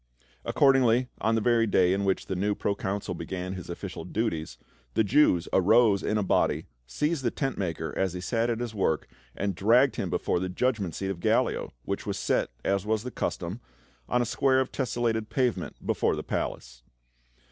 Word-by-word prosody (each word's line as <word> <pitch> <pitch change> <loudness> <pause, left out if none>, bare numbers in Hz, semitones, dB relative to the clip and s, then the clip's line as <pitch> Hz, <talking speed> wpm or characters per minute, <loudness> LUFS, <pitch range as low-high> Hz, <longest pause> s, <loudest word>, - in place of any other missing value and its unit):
Accordingly, 130 -3 +3
on 115 0 +1
the 110 - +1
very 115 0 +3
day 95 -2 +3
in 100 +1 0
which 95 -1 0
the 95 - -3
new 100 +3 0
pro 100 - 0
consul 100 -1 -3
began 90 +2 -5
his 90 -2 -8
official 90 +2 -6
duties, 90 -6 -2 0.4
the 110 - +4
Jews 105 - +3
arose 105 +1 +5
in 105 - 0
a 105 - +1
body, 95 - +1 0.2
seized 150 - -1
the 120 - +2
tent 135 +2 -2
maker 80 -4 -3
as 95 -2 0
he 90 - -5
sat 115 +6 0
at 115 -1 -1
his 120 -2 -4
work, 95 -7 0 0.3
and 100 0 -1
dragged 115 +8 +4
him - - -2
before - - 0
the 95 +1 -2
judgment 100 -4 -1
seat 95 0 -2
of 90 - -6
Gallio, - - +1
which - - -3
was - - -2
set, - - 0 0.2
as 100 -1 +1
was 110 0 0
the 125 - -5
custom, - - -3 0.5
on 125 0 +2
a - - -2
square 130 +1 +2
of 130 - -1
tesselated 115 -4 -1
pavement 125 -3 -1
before - - +1
the - - -5
palace. - - -4
105 Hz, 190 wpm, -27 LUFS, 95-120 Hz, 0.5 s, arose